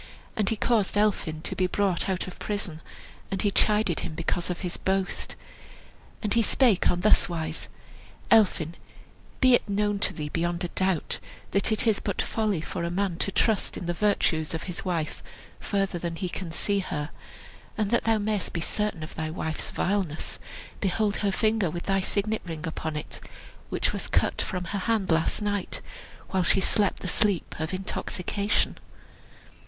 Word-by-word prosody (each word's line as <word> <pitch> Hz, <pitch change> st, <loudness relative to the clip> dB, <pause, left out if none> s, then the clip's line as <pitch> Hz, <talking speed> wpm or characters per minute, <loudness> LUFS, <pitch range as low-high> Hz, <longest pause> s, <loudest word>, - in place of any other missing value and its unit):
And 210 Hz, -4 st, +1 dB
he 225 Hz, -, +1 dB
caused 215 Hz, -2 st, +1 dB
Elphin 185 Hz, -7 st, +1 dB
to -, -, -2 dB
be 185 Hz, -, +2 dB
brought 195 Hz, -1 st, +1 dB
out 185 Hz, -1 st, 0 dB
of 185 Hz, -, -9 dB
prison, 195 Hz, -7 st, -3 dB, 0.5 s
and 195 Hz, -1 st, -1 dB
he 205 Hz, -, +3 dB
chided 210 Hz, -4 st, +2 dB
him 155 Hz, -, -4 dB
because 170 Hz, +2 st, -1 dB
of 180 Hz, -, -3 dB
his 180 Hz, -2 st, -2 dB
boast. 190 Hz, 0 st, -1 dB, 0.9 s
And 210 Hz, -, +1 dB
he 230 Hz, -, +5 dB
spake 230 Hz, -3 st, +4 dB
on 175 Hz, -, +1 dB
this 215 Hz, -2 st, +5 dB
wise: 160 Hz, -2 st, -3 dB, 0.6 s
"Elphin, 185 Hz, -7 st, +4 dB, 0.7 s
be 255 Hz, -2 st, +7 dB
it 240 Hz, -, +3 dB
known 205 Hz, 0 st, +1 dB
to -, -, +3 dB
thee 150 Hz, -1 st, -4 dB
beyond 170 Hz, +2 st, -1 dB
a 175 Hz, -, -1 dB
doubt, 185 Hz, -3 st, +1 dB, 0.3 s
that 200 Hz, +2 st, +2 dB
it 220 Hz, -, +4 dB
is 220 Hz, -3 st, +3 dB
but -, -, -3 dB
folly 210 Hz, -7 st, 0 dB
for -, -, -4 dB
a 170 Hz, -, 0 dB
man 185 Hz, -1 st, 0 dB
to 195 Hz, -, +1 dB
trust 215 Hz, 0 st, +1 dB
in -, -, -5 dB
the 175 Hz, -, 0 dB
virtues 170 Hz, -5 st, +1 dB
of 160 Hz, -, -3 dB
his 180 Hz, -2 st, -5 dB
wife 170 Hz, -4 st, -2 dB, 0.4 s
further 195 Hz, -3 st, 0 dB
than 170 Hz, -1 st, -3 dB
he 185 Hz, +1 st, -2 dB
can 175 Hz, -1 st, -4 dB
see 200 Hz, +4 st, +1 dB
her; 160 Hz, -5 st, -3 dB, 0.7 s
and 215 Hz, -2 st, 0 dB
that 235 Hz, -, +2 dB
thou 225 Hz, -1 st, +4 dB
mayest 210 Hz, -2 st, -1 dB
be 170 Hz, -, -1 dB
certain 210 Hz, -2 st, -1 dB
of 155 Hz, -, -7 dB
thy 160 Hz, -1 st, -3 dB
wife's 160 Hz, -1 st, -3 dB
vileness, 185 Hz, -5 st, -1 dB, 0.4 s
behold 205 Hz, +1 st, +1 dB
her 200 Hz, -1 st, +1 dB
finger, 215 Hz, -2 st, +2 dB
with 170 Hz, +2 st, -4 dB
thy 195 Hz, 0 st, +2 dB
signet 215 Hz, +3 st, 0 dB
ring 165 Hz, -2 st, -5 dB
upon 160 Hz, -1 st, -3 dB
it, 150 Hz, -, -5 dB, 0.5 s
which -, -, 0 dB
was -, -, -3 dB
cut -, -, +1 dB
from 180 Hz, -, -3 dB
her 195 Hz, +3 st, -2 dB
hand 205 Hz, -3 st, +1 dB
last 160 Hz, +6 st, +2 dB
night, 205 Hz, -2 st, -1 dB, 0.5 s
while 190 Hz, -, +2 dB
she 180 Hz, +2 st, +4 dB
slept 200 Hz, +1 st, +2 dB
the -, -, -4 dB
sleep 200 Hz, -1 st, +1 dB
of 160 Hz, 0 st, -2 dB
intoxication." 195 Hz, +2 st, -1 dB
190 Hz, 180 wpm, -27 LUFS, 170-210 Hz, 0.9 s, be